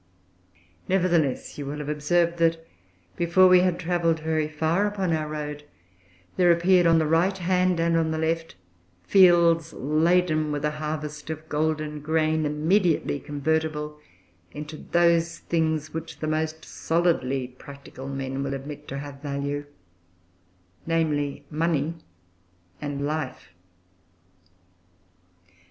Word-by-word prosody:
Nevertheless, 175 -8 +1
you 140 - -5
will 145 +2 -4
have 150 -1 -6
observed 170 +3 +1
that 165 0 +1 0.5
before 175 +2 +5
we 180 0 +7
had 180 -1 +1
travelled 170 -2 +1
very 155 -1 0
far 160 +6 0
upon 195 -4 -1
our 155 -1 -1
road, 150 -1 -5 0.7
there 180 -1 +5
appeared, 175 +1 +4
on 165 0 +5
the 160 - +2
right 170 +5 +2
hand 180 -1 +1
and 165 0 +2
on 165 -1 +2
the 160 - -2
left, 165 +1 -2 0.5
fields 170 - +5
laden 155 +1 +1
with 145 0 -2
a 150 - +1
harvest 150 0 -5
of 160 0 -6
golden 155 0 -1
grain, 155 0 +1
immediately 160 0 +1
convertible 150 +1 -2 0.5
into 150 +1 -7
those 170 0 +2
things 160 -2 -1
which 160 0 -6
the - - -4
most 155 +1 -2
solidly 135 -7 0
practical 135 +1 -11
men 135 0 -4
will 140 0 -2
admit 145 +2 -8
to 135 - -5
have 140 -1 -8
value 145 0 -3 1.2
viz., 150 -4 0
money 160 0 0 0.9
and 145 -1 -3
life. 150 -7 -4
155 Hz, 125 wpm, -25 LUFS, 150-170 Hz, 1.2 s, we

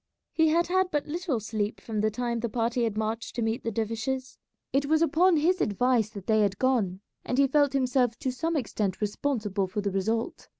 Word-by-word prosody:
He 320 -1 +4
had 335 +2 +3
had 375 +1 +1
but 295 -3 -1
little 320 -5 -2
sleep 215 0 -3
from 215 -2 -3
the 215 - +2
time 235 +1 -2
the 235 0 -2
party 235 +1 0
had 215 -2 -2
marched 220 +1 -3
to 235 - -1
meet 225 +1 -1
the 230 - -1
dervishes. 230 +4 -3 0.3
It 275 +1 +2
was 315 +2 +3
upon 335 +1 +4
his 355 +5 +2
advice 225 +1 +2
that 200 -4 -9
they 220 0 +3
had 200 -2 +1
gone, 215 -8 +1 0.2
and 250 - -2
he 280 - +6
felt 285 0 +2
himself 255 -3 +1
to 260 - -2
some 325 +6 -2
extent 215 - -2
responsible 210 -3 -1
for 195 +3 -3
the 200 -1 -1
result. 225 - -2
235 Hz, 210 wpm, -27 LUFS, 215-285 Hz, 0.3 s, he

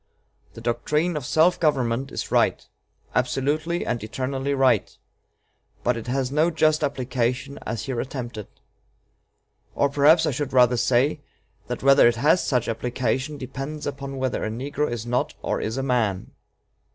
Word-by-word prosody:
The 115 - -9
doctrine 150 +9 0
of 140 -4 -4
self 170 +3 +3
government 135 -4 0
is - - -5
right - - +2 0.5
absolutely 155 +6 0
and 120 - -2
eternally 135 +5 -2
right 135 -2 +2 0.9
but 125 - +2
it 115 +1 -7
has 130 0 -1
no 155 +4 +3
just 155 -2 +2
application 130 0 -2
as 115 - -3
here 130 -4 -3
attempted. 120 -5 -6 1.3
Or 140 - +2
perhaps 150 +4 +5
I 155 - +1
should 140 +1 -3
rather 125 -1 +5
say, 125 +4 +2 0.5
that - - -5
whether 135 -2 +7
it 120 - +2
has 150 +9 +3
such 125 -4 0
application 125 +5 -2
depends 135 +3 -6
upon 140 -1 -5
whether 130 -1 -1
a - - -1
negro 140 +6 -2
is 120 -1 -4
not 125 +1 -1
or - - -1
is 110 +4 -3
a 135 - -1
man. 115 -8 0
135 Hz, 150 wpm, -24 LUFS, 120-145 Hz, 1.3 s, whether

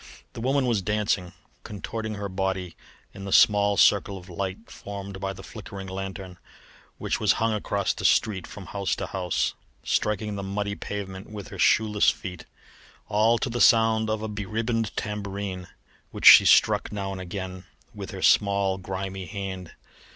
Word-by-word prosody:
The 120 - -7
woman 135 +2 +1
was 115 -5 +1
dancing, 100 -3 -1 0.3
contorting 110 +1 -5
her 100 0 -4
body 95 -2 -3 0.4
in 100 - -9
the 100 - -5
small 100 -1 +5
circle 100 -1 +4
of 90 0 -13
light 95 +4 -5
formed 100 -1 -8
by 95 0 -3
a 95 - -5
flickering 95 +1 -9
lanthorn 95 -1 -7 0.6
which - - -2
was - - +3
hung 115 0 0
across 100 -1 -1
the - - -8
street 95 -5 +2
from 100 - -10
house 100 0 -2
to - - -4
house, 90 -2 -1 0.3
striking 105 0 -1
the 100 - -4
muddy 100 +1 -3
pavement 100 -1 -6
with 105 -2 -8
her - - -10
shoeless 105 -2 +4
feet, 90 -4 -6 0.6
all 110 +3 +3
to 120 - -2
the 120 0 -2
sound 110 -1 +4
of 110 0 -2
a - - -2
be 105 -1 -5
ribboned 115 +1 -1
tambourine 100 -3 -4 0.4
which - - -6
she - - +11
struck - - +4
now 100 -2 -4
and 95 -1 -6
again 95 0 -6 0.3
with - - -7
her - - -7
small, 100 -1 +3
grimy 95 0 -5
hand. 95 -2 -6
100 Hz, 165 wpm, -26 LUFS, 95-105 Hz, 0.6 s, she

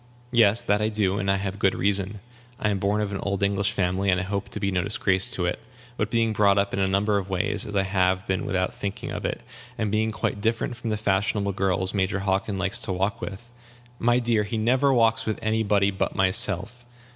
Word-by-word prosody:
"Yes, 115 -2 +4
that 105 +1 +1
I 105 - +1
do; 105 -2 0
and 100 - -1
I 95 - +4
have 95 0 -4
good 95 -2 +2
reason. 100 +1 -1 0.4
I 105 - +1
am 100 - -1
born 100 +2 +1
of 105 -1 -2
an 100 - -3
old 100 0 -2
English 100 0 +1
family, 95 +1 0
and 90 0 +3
I - - -2
hope 100 +1 -3
to - - -5
be 100 - -1
no 90 -1 +1
disgrace 95 -1 +2
to 90 - -1
it. 90 - -1 0.4
But 105 -3 -1
being 115 -1 +1
brought 100 -1 +3
up 100 0 +1
in 95 - -1
a 95 - +2
number 100 +2 +1
of 100 0 -7
ways, 95 +2 0
as 105 - -6
I 95 - +3
have 95 -1 +1
been 95 -1 -1
without 95 -1 -1
thinking 100 -1 -5
of - - -5
it, - - -3 0.3
and 105 -2 -1
being 110 +1 +1
quite 105 0 -3
different 115 +2 -1
from 115 -1 -5
the 105 - 0
fashionable 100 0 0
girls 95 -1 0
Major 100 0 0
Hockin 100 +1 -1
likes 95 +1 -1
to - - -1
walk 95 +2 -1
with 105 +5 -7 0.2
" 120 0 -27
"My 120 - +4
dear, 120 -3 +1
he 105 +2 -3
never 130 +5 +3
walks 115 -2 +2
with 110 - -1
any 110 +1 +1
body 100 -2 +2
but 95 - -2
myself!" 100 +4 0
100 Hz, 240 wpm, -25 LUFS, 95-110 Hz, 0.4 s, Yes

